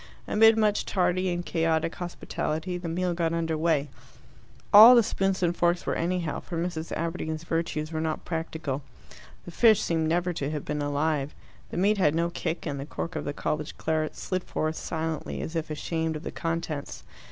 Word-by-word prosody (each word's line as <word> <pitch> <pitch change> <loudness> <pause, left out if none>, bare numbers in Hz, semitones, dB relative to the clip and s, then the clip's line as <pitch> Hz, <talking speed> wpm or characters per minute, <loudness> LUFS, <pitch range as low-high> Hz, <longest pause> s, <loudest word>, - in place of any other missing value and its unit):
Amid 225 +1 +6
much 210 -1 +2
tardy 185 0 +1
and 175 0 -2
chaotic 165 -1 0
hospitality 175 -1 -3
the 175 -1 -4
meal 180 +2 0
got 165 -1 0
under 165 -1 -1
way. 155 -2 +1 0.9
All 225 +5 +11
the 235 - +6
spoons 195 -3 0
and 175 0 +2
forks 175 0 +1
were - - 0
anyhow, 170 -2 -1
for 170 - -6
Mrs. 165 -1 -3
Aberdeen's 165 -1 -3
virtues 165 -2 -2
were 160 -1 -2
not 160 -1 -2
practical. 160 -4 -3 0.6
The - - -8
fish 220 +3 +5
seemed 160 -1 0
never 175 +2 +1
to 140 -3 -3
have 150 -2 -4
been 150 0 -2
alive, 145 0 -1 0.3
the - - -6
meat 200 +3 +3
had 150 -4 +3
no 170 +1 +1
kick, 165 0 -3
and 145 -3 -3
the 135 - -5
cork 170 +2 -5
of - - -3
the 145 - -1
college 150 +1 -3
claret 155 -1 -1
slid 185 -1 -3
forth 155 0 -2
silently, 160 -1 -3
as 160 - -5
if 165 -1 -2
ashamed 160 +1 -2
of 155 - -6
the - - -5
contents. 165 -3 -4
165 Hz, 185 wpm, -27 LUFS, 155-175 Hz, 0.9 s, All